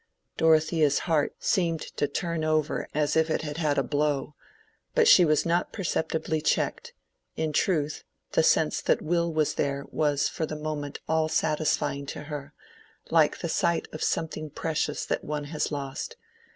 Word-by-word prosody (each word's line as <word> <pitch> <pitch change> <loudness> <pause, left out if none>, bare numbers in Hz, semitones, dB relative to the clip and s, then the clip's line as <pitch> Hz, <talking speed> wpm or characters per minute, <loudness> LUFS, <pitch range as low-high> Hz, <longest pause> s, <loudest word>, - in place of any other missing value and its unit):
Dorothea's 155 -2 +3
heart 160 -4 +1
seemed 165 -4 0
to 145 - +1
turn 170 0 -2
over 155 -1 0
as 150 0 0
if 160 0 +3
it 155 - 0
had 150 0 -5
had 150 -3 +1
a 135 - +3
blow, 145 0 -1 0.6
but 475 -2 +5
she 185 - +8
was 155 -2 +3
not 170 +1 +1
perceptibly 160 -4 -1
checked: 150 - -1 0.4
in 160 -1 -2
truth, 155 -3 0 0.3
the - - +3
sense - - +3
that - - +1
Will 170 +1 +1
was 155 -2 +1
there 140 -1 -1
was 145 -2 +1
for 160 - -3
the 155 - -5
moment 150 -2 -4
all 160 0 +1
satisfying 150 -3 0
to 145 - -6
her, 145 -2 -7 0.6
like 160 -2 +3
the 170 - -2
sight 170 0 0
of 155 - -7
something 155 -1 -2
precious 150 0 -2
that - - -2
one 150 0 -3
has 155 - -1
lost. 140 - -4
155 Hz, 165 wpm, -27 LUFS, 145-160 Hz, 0.6 s, she